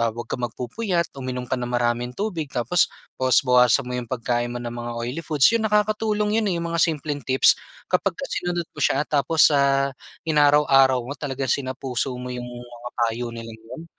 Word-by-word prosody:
ah, 115 - +2
'wag 120 +1 -6
ka - - -2
magpupuyat 170 - -2
uminom 130 -1 -4
ka 130 +1 -2
ng 120 - -3
maraming 120 0 0
tubig 180 -8 -3
tapos 125 +8 +2 0.3
bawas-bawasan 125 -1 +4
mo 125 - -4
'yong 120 -2 -5
pagkain 120 -1 -1
mo - - -5
ng 120 -1 -5
mga 120 0 -5
oily 120 +7 -3
foods. 150 -4 +1
'Yon 230 -1 +1
nakakatulong 210 0 +1
'yon 210 - 0
eh - - -1
'yong 170 0 -3
mga 170 - +1
simpleng 150 -3 0
tips 130 0 +5 0.4
kapag - - +1
ka 275 - -5
sinunod 175 -1 -2
mo 150 - -13
siya. 140 +1 +2
Tapos 155 +2 +4
sa 140 -1 +2 0.3
inaraw-araw 145 -4 +4
mo 140 - -5
talagang 135 -2 -3
sina 130 -2 -2
puso 130 0 -2
mo 125 0 -6
'yong 125 0 -6
mga 120 0 -9
payo 120 0 -1
nila 115 -1 -8
'yon 120 +8 -10
130 Hz, 195 wpm, -23 LUFS, 120-160 Hz, 0.4 s, tips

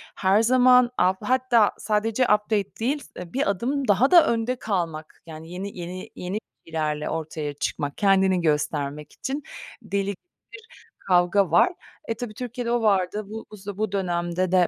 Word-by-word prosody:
Her 195 +3 +3
zaman 250 0 +5
alt 185 +1 +3
hatta 250 -4 +3
sadece 220 +3 0
update 210 -2 +1
değil, 275 +6 0 0.2
s 175 -1 -8
bir 270 -5 +1
adım 260 +7 -1
daha 220 - +3
da 345 -2 +8
önde 235 +2 0
kalmak, 170 -9 -4
yani 160 +1 -10
yeni 190 +2 -6
yeni 180 +2 -7
yeni 185 +4 -4 0.3
bilgilerle 155 -2 -2
ortaya 155 -2 -4
çıkmak, 145 0 -3
kendini 190 -2 +3
göstermek 150 -1 -1
için 280 +2 -4 0.4
deli 200 -2 -2 0.4
bir 445 +1 -12 0.4
kavga 180 0 +3
var. 350 - +5 0.3
E, 225 - 0
tabii, 225 -2 -6
Türkiye'de 245 0 -4
o 240 -1 +1
vardı. 205 0 +1
Bu 220 +1 -7
bu 210 - -10
z 195 +1 -16 0.2
dönemde 175 -1 -1
de 180 -2 +4
200 Hz, 155 wpm, -24 LUFS, 175-235 Hz, 0.4 s, da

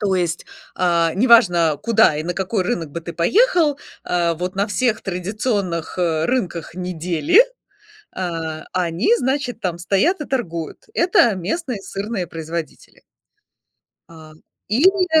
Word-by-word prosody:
То 200 -2 +1
есть, 175 -2 -1 0.3
а, 170 -2 +2
не 210 +8 +2
важно, 175 -9 +5
куда 220 -9 +4
и 150 - -2
на 175 +1 -3
какой 190 +1 -1
рынок 165 -3 -2
бы 170 - -5
ты 170 +1 -7
поехал, 315 - +3 0.3
а, 170 -1 0
вот 180 +3 -4
на 200 - +1
всех 230 +1 0
традиционных, 185 -2 -3
э, 165 -3 +1
рынках 185 -11 -2
недели, 180 - +2 0.7
а, 165 -3 -4
они, 180 - +1
значит, 265 - -2
там 175 -3 -2
стоят 200 - +1
и - - -4
торгуют. 170 - -4
Это 295 - +3
местные 230 - -3
сырные 200 -1 -4
производители. 165 0 -7 1.1
А, 160 -1 -13 0.4
или, 340 - +3
185 Hz, 135 wpm, -20 LUFS, 170-240 Hz, 1.1 s, важно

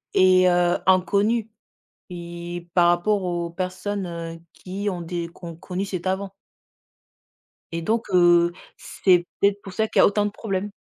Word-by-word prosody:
est, 185 0 +5
heu, 175 0 +2
inconnue 200 +5 +2 0.6
i 175 0 -7
par 175 -1 +4
rapport 190 +4 +2
aux 175 -1 -2
personnes, 185 +3 -4
heu, 165 -1 -7
qui 195 +3 -5
ont 180 -3 -3
des 170 0 -4
qui 170 - -16
ont 170 -1 -7
connu 180 +3 -4
cet 185 -3 -5
avant 190 +1 -1 1.4
et 165 0 -3
donc, 225 +7 0
heu, 175 -1 +5 0.3
c'est 180 -2 +2 0.2
peut-être 200 0 +2
pour 195 - -10
ça 220 +3 0
qu'il - - +3
y - - +7
autant 205 +1 +2
de 205 - -2
problèmes. 200 -1 -4
185 Hz, 160 wpm, -23 LUFS, 175-200 Hz, 1.4 s, y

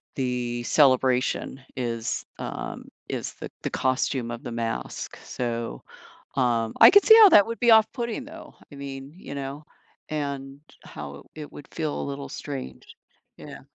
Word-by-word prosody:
the 125 -2 -2
celebration, 130 -1 +2 0.2
is, 115 -2 -2 0.2
um, - - -6 0.2
is - - -4
the - - -8
the - - -1
costume 130 -1 0
of 120 0 -7
the 120 - -6
mask, 115 - -4
so, 115 - -4 0.6
um, 115 -4 +1
I - - +11
could 405 +1 +7
see 440 - +9
how 440 -2 +10
that 205 - +7
would 230 0 -5
be 240 -1 +5
off-putting, 235 +3 +3
though, 320 +3 -12 0.2
I - - -9
mean, 135 0 -7
you 165 - -8
know, 140 +2 -6 0.4
and 140 -2 -4 0.2
how 70 -1 -9
it 150 -1 -9
would 145 - -11
feel 155 -3 -2
a - - -3
little 140 0 -5
strange. 135 - -7 0.4
Yeah. - - -10
135 Hz, 155 wpm, -25 LUFS, 120-150 Hz, 0.6 s, I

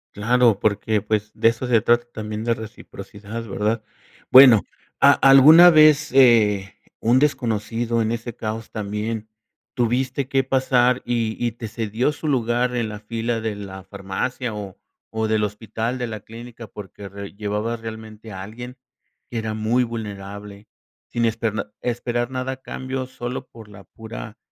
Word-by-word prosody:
Claro, 115 0 +3
porque, 105 0 0
pues, 105 0 -2
de - - +2
eso 115 +2 0
se 120 -3 +3
trata 120 +2 +3
también, 110 0 -5
de 115 0 +1
reciprocidad, 110 0 -9
¿verdad? 105 +3 -1 0.5
Bueno, 125 -5 +9 0.4
¿a 140 +1 +7
alguna 150 +7 +8
vez, 155 -1 +5
eh, 110 -7 +4 0.2
un 120 +3 +3
desconocido 115 -4 0
en 110 - -1
ese 115 0 -5
caos 110 -1 -5
también 105 +1 -4 0.5
tuviste 130 +2 -1
que 135 -1 +1
pasar 130 -1 +2
y 115 -2 -1
y 120 -2 0
te 115 -1 -7
cedió 110 +5 -1
su 155 +1 -6
lugar 125 -2 0
en 115 -3 -1
la 105 -1 -7
fila 115 +1 -3
de 110 -2 -3
la 95 -2 -8
farmacia, 105 +6 -4
o 100 -3 -7 0.4
o 110 0 0
del 110 -1 +1
hospital, 110 +3 -3
de 125 - -1
la 110 -2 -6
clínica?, 115 +1 -11
porque 100 -1 -10
re 100 +1 -9
llevabas 105 +3 -3
realmente 110 -1 -9
a 95 -1 -7
alguien 120 +5 -9 0.5
que 120 - -4
era 110 -1 -3
muy 110 +4 +1
vulnerable, 100 -2 -7 0.4
sin 120 0 0
esper 115 -1 -1 0.3
esperar 120 0 -2
nada 130 0 -3
a - - -10
cambio, 130 0 -5
solo 125 0 -6
por 115 -2 -14
la 100 -1 -14
pura 110 +3 -10
115 Hz, 155 wpm, -22 LUFS, 105-125 Hz, 0.5 s, Bueno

